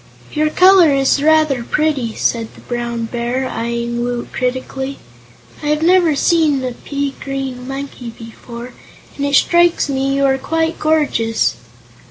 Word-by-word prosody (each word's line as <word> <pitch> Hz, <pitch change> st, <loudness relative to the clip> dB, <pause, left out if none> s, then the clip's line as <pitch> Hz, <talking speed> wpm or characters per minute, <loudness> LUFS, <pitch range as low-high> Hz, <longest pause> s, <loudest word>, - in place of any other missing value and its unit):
"Your 305 Hz, 0 st, +1 dB
color 365 Hz, -1 st, +6 dB
is 275 Hz, 0 st, +2 dB
rather 305 Hz, -4 st, +3 dB
pretty," 275 Hz, -5 st, -1 dB
said 230 Hz, -2 st, -1 dB
the -, -, -15 dB
Brown 235 Hz, -1 st, -3 dB
Bear, 240 Hz, +3 st, -2 dB
eyeing 235 Hz, 0 st, -3 dB
Woot 245 Hz, 0 st, -4 dB
critically. 265 Hz, +2 st, -3 dB, 0.6 s
"I 295 Hz, -, -4 dB
have 300 Hz, +1 st, +1 dB
never 345 Hz, -3 st, +4 dB
seen 300 Hz, -3 st, +2 dB
a 255 Hz, -, -2 dB
pea 280 Hz, +3 st, -4 dB
green 265 Hz, -2 st, -5 dB
monkey 270 Hz, -3 st, -6 dB
before, 235 Hz, +2 st, -10 dB, 0.4 s
and 285 Hz, 0 st, -2 dB
it 280 Hz, -, +1 dB
strikes 345 Hz, -1 st, +3 dB
me 275 Hz, 0 st, 0 dB
you 275 Hz, 0 st, +2 dB
are 270 Hz, 0 st, +2 dB
quite 325 Hz, +3 st, -1 dB
gorgeous." 295 Hz, -8 st, +1 dB
270 Hz, 145 wpm, -17 LUFS, 240-305 Hz, 0.6 s, color